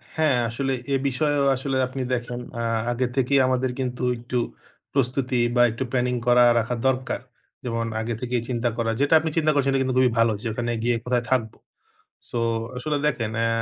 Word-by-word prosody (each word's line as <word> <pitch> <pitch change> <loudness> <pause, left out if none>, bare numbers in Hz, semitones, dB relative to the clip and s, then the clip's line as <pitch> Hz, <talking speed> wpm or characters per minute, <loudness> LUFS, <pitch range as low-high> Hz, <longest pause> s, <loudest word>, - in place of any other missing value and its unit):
হ্যাঁ, 155 -5 +3
আসলে 135 +3 -1 0.2
এ - - +4
বিষয়েও 145 +1 +1
আসলে 135 +1 -2
আপনি 130 +1 -5
দেখেন 120 0 -3 0.2
আ - - -1 0.3
আগে 125 +1 0
থেকেই 135 +1 +3
আমাদের 130 0 +1
কিন্তু 125 -1 -3
একটু 120 +1 -4 0.6
প্রস্তুতি 130 -1 0 0.2
বা 120 - +5
একটু 115 +4 -3
প্ল্যানিং 125 -1 +1
করা 120 0 +6 0.2
রাখা 115 +2 -1
দরকার। 130 -1 0 0.4
যেমন 115 -2 -2 0.2
আগে 115 +1 -2
থেকেই 125 -1 -1
চিন্তা 120 -1 0
করা 115 -1 0
যেটা 145 +2 +2
আপনি 160 +1 -2
চিন্তা 155 -1 +3
করছেন 140 -1 +2
সেটা 135 - +2
কিন্তু 130 -1 0
খুবই 125 -2 +4
ভালো, 115 -1 +4
যে 120 - -4
ওখানে 120 +1 -2
গিয়ে 120 0 +2
কোথায় 125 -1 +1
থাকব? 115 -4 +1 0.8
সো 120 - -2 0.4
আসলে 150 +4 -1
দেখেন 115 -7 0
অ্যা 115 0 +2
125 Hz, 185 wpm, -24 LUFS, 120-135 Hz, 0.8 s, করা